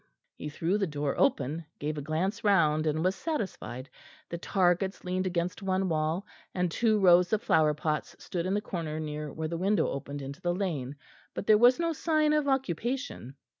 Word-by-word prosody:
He 150 - -6
threw 170 +7 0
the 195 - +1
door 145 -2 -2
open, 160 - +1
gave 150 +1 -3
a 145 - -4
glance 180 +10 -2
round, 160 -7 +3
and 155 +1 0
was 185 +2 +2
satisfied. 190 - -4 0.4
The 170 - -4
targets 185 +1 +1
leaned 185 +1 -1
against 175 +1 -2
one 190 -1 0
wall, 160 +4 0 0.3
and 180 -2 0
two 220 +3 +2
rows 180 -2 +5
of 215 +1 +1
flower 155 -8 +3
pots 150 0 -2
stood 175 0 -4
in 190 - +1
the 205 - 0
corner 165 -6 -4
near 150 -1 -4
where 160 0 -3
the 170 +1 -3
window 195 -2 +2
opened 140 +1 -5
into 140 +1 -8
the 175 0 0
lane, 150 -9 -2 0.4
but - - -4
there 215 - +6
was 245 +4 +6
no 335 -1 +1
sign 310 -1 +2
of 300 -1 +1
occupation. 250 - -2
175 Hz, 190 wpm, -29 LUFS, 155-205 Hz, 0.4 s, there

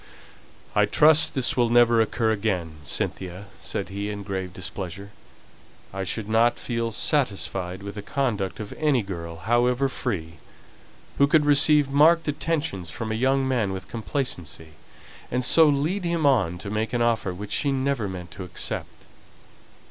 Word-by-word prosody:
"I - - +4
trust 155 +1 +5
this 130 -2 +2
will 120 -2 +2
never 120 -1 +5
occur 110 0 0
again, 95 -7 -2
Cynthia!" 90 +5 -3
said - - -4
he, 100 +1 -4
in 105 -1 -5
grave 95 -2 -4
displeasure. 95 +1 -6 0.8
"I 95 0 -3
should 105 +3 -2
not 115 +2 +3
feel 115 -1 -3
satisfied 100 - -1
with 100 0 -6
the 105 - -6
conduct 105 -5 -2
of 105 -2 -6
any 145 -7 +2
girl, 85 -4 -6
however 120 +8 +1
free, 80 -11 -4 0.8
who 140 - +6
could 150 0 +3
receive 145 0 +5
marked 160 +4 +4
attentions 145 - -2
from 110 +6 -5
a 110 +1 -2
young 135 0 +2
man 115 -7 0
with 95 0 -7
complacency, 105 - -4 0.6
and 125 +1 -1
so 160 +4 +6
lead 150 +7 0
him 170 -3 0
on 100 -11 +2
to 100 +3 -7
make 110 +2 -2
an 120 -1 +1
offer 115 -5 0
which 100 +3 -8
she 140 - +1
never 135 -5 -1
meant 90 -2 -8
to 95 - -8
accept. 90 - -5
110 Hz, 155 wpm, -24 LUFS, 95-135 Hz, 0.8 s, who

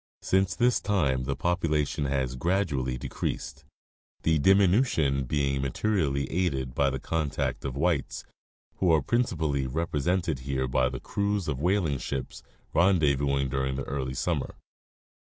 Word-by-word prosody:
Since 95 0 +2
this 125 0 +3
time 70 -11 +1
the 70 +1 -1
population 75 -5 0
has 65 -2 -1
gradually 70 -6 0
decreased, - - -4 0.6
the 80 -1 +3
diminution 90 - +3
being 70 0 0
materially 70 - 0
aided 70 -8 -1
by 70 +1 +2
the 65 - -3
contact 75 0 -2
of 65 -2 -4
whites, 80 -2 -1 0.5
who 90 -3 +3
are 80 -3 +3
principally 80 - 0
represented 80 +2 -1
here 65 0 -2
by 65 0 +2
the 65 0 -6
crews 100 +3 -1
of 70 -4 -1
the 70 - -6
whaling 90 -7 +1
ships, 70 -2 -5 0.3
rendezvousing 70 -6 +2
during 65 0 -1
the 70 - -3
early 65 -1 -3
summer. 75 0 -2
70 Hz, 135 wpm, -27 LUFS, 65-90 Hz, 0.6 s, this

